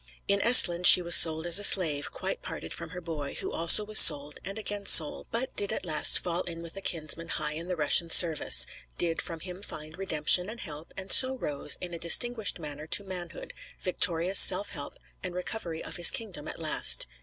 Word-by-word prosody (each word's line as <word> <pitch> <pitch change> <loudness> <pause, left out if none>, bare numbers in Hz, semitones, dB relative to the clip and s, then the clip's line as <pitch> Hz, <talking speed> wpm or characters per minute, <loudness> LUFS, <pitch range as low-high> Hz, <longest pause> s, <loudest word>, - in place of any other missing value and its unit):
In 200 0 -4
Esthland 180 -7 +5
she 180 - +6
was 170 0 0
sold 160 -1 +2
as 175 +2 +1
a - - -10
slave, 155 -8 0
quite - - -10
parted 80 - -13
from 170 -1 -12
her 180 +1 -14
boy, 155 -4 -12
who - - -8
also 170 +5 +4
was 215 +1 +6
sold, 145 -1 +5
and 195 +2 -11
again 205 -2 -10
sold; 155 -3 +4
but 240 +3 -8
did 200 - -5
at - - -9
last 155 -3 +2
fall 175 0 -6
in 170 -2 -12
with 165 +1 -14
a 195 - -13
kinsman 165 -2 -5
high 155 -2 -9
in 165 +3 -11
the 180 - -8
Russian 165 +2 -1
service; 165 -2 +2 0.3
did 165 -1 -6
from 165 -2 -12
him 180 +2 -14
find 155 -3 -14
redemption 180 +1 -2
and 230 +2 -14
help, 150 +1 -15
and 190 0 -11
so 260 0 +5
rose, 150 - -5
in 175 -1 -12
a 170 - -12
distinguished 220 +5 -1
manner, 150 -2 -12
to 200 - -3
manhood, 180 -3 -13 0.3
victorious 180 0 -1
self 200 +2 +3
help, 145 - -12 0.3
and 180 -2 -12
recovery 180 -3 -11
of - - -11
his 175 - +4
kingdom 185 -9 -9
at - - -12
last. 160 -2 -1
175 Hz, 210 wpm, -22 LUFS, 160-195 Hz, 0.3 s, she